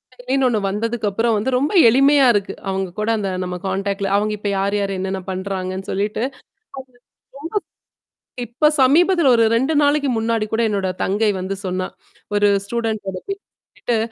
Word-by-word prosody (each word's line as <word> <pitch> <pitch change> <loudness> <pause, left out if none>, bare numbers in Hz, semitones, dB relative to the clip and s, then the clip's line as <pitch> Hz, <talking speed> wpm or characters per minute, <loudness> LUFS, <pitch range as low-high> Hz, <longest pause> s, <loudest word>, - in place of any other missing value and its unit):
செயலின்னு 255 +2 0
ஒன்னு 225 -4 +1
வந்ததுக்குப்புறம் 225 +1 -1
வந்து 215 +6 -1
ரொம்ப 285 +7 0
எளிமையா 275 +4 +5
இருக்கு. 200 -2 -1 0.2
அவுங்க 190 -1 -2
கூட 215 +2 -1
அந்த 200 -2 -2
நம்ம 180 0 -4
கான்டாக்ட்ல 195 +1 -2
அவுங்க 210 +1 +1
இப்ப 205 0 -3
யார் 200 +1 0
யாரு, 200 -1 -1
என்னென்னா 190 0 -3
பண்றாங்கன்னு, 190 0 -4
சொல்லிட்டு 205 +3 -1
அது 270 0 -8 0.4
ரொம்ப 260 -2 -11 1.5
இப்ப 240 +7 -1 0.2
சமீபத்தில 330 +2 +4
ஒரு 230 -1 +4
2 265 +7 +1
நாளைக்கு 285 -1 +2
முன்னாடி 225 -1 0
கூட 225 - +1
என்னோட 200 -2 -1 0.2
தங்கை 210 +3 +1
வந்து 190 +2 -3
சொன்னா. 185 0 -2 0.5
ஒரு 205 0 +4 0.2
ஸ்டூடண்ட்டோட 215 -4 -3
பேர 395 - -3 0.3
சொல்லிட்டு 235 - -3
215 Hz, 155 wpm, -20 LUFS, 195-250 Hz, 1.5 s, எளிமையா